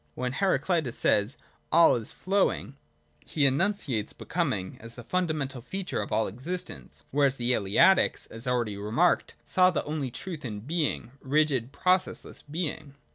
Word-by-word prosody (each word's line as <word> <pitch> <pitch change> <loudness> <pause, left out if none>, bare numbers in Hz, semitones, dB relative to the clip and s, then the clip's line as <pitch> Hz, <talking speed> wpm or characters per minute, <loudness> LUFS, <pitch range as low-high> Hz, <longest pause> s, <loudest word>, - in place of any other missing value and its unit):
When 125 0 -2
Heraclitus 170 -6 +1
says 105 +5 +2 0.2
' - - -38
All 170 +1 +6
is 115 -3 -2
flowing 195 +1 0
{ixavTa 75 - -24
pa.), - - -25
he 145 -3 +3
enunciates 140 - 0
Becoming 130 - -2
as 115 +1 -11
the 120 - -9
fundamental 155 -5 -1
feature 185 +9 -3
of - - -6
all 110 +1 +2
existence, 130 - -6
whereas 140 -1 +3
the 120 -1 0
Eleatics, 110 - +3
as 115 +3 -5
already 120 -5 0
remarked, 110 - +1
saw 185 0 +4
the 175 - -1
only 150 -3 -3
truth 165 +5 -6
in 105 -5 -5
Being, 150 -2 -1
rigid 135 -3 +1
processless 185 +4 0
Being. 150 -3 -4
140 Hz, 155 wpm, -28 LUFS, 115-170 Hz, 0.2 s, All